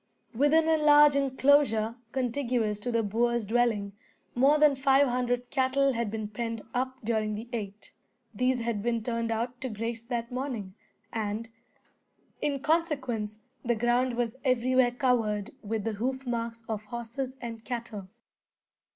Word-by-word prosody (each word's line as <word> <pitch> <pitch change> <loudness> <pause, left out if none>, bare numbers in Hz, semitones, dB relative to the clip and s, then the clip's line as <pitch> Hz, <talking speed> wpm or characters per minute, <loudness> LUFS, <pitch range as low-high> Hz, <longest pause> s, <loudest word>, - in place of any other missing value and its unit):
Within 290 +6 +3
a 320 0 +4
large 295 -1 +7
enclosure, 265 -4 +3 0.2
contiguous 245 -4 -1
to 245 +4 -3
the 230 -1 +1
boer's 235 +2 +1
dwelling, 220 -3 +1 0.4
more 275 +5 +4
than 300 -2 +5
five 270 +1 +4
hundred 245 0 -1
cattle 270 0 +2
had 235 -2 -1
been 215 0 -4
penned 230 +1 -4
up 260 +1 -1
during 215 -1 0
the 220 +3 -7
eight. 205 -2 -6 0.4
These 250 +3 +1
had 230 -3 -2
been 230 0 -1
turned 230 -1 -2
out 240 +3 -2
to 260 - -3
graze 230 +1 -4
that 235 -1 -3
morning, 245 -7 -4 0.4
and, 220 +1 -3 0.9
in 280 -2 -1
consequence, 265 -9 -1 0.2
the 240 -1 +1
ground 240 +2 +1
was 235 -1 -1
everywhere 255 -1 +3
covered 235 -5 0
with 220 0 -3
the 225 - -2
hoof 260 +5 -3
marks 230 -1 -3
of 215 -1 -4
horses 240 +3 -5
and 230 -2 -7
cattle. 230 -6 -5
240 Hz, 145 wpm, -28 LUFS, 225-260 Hz, 0.9 s, large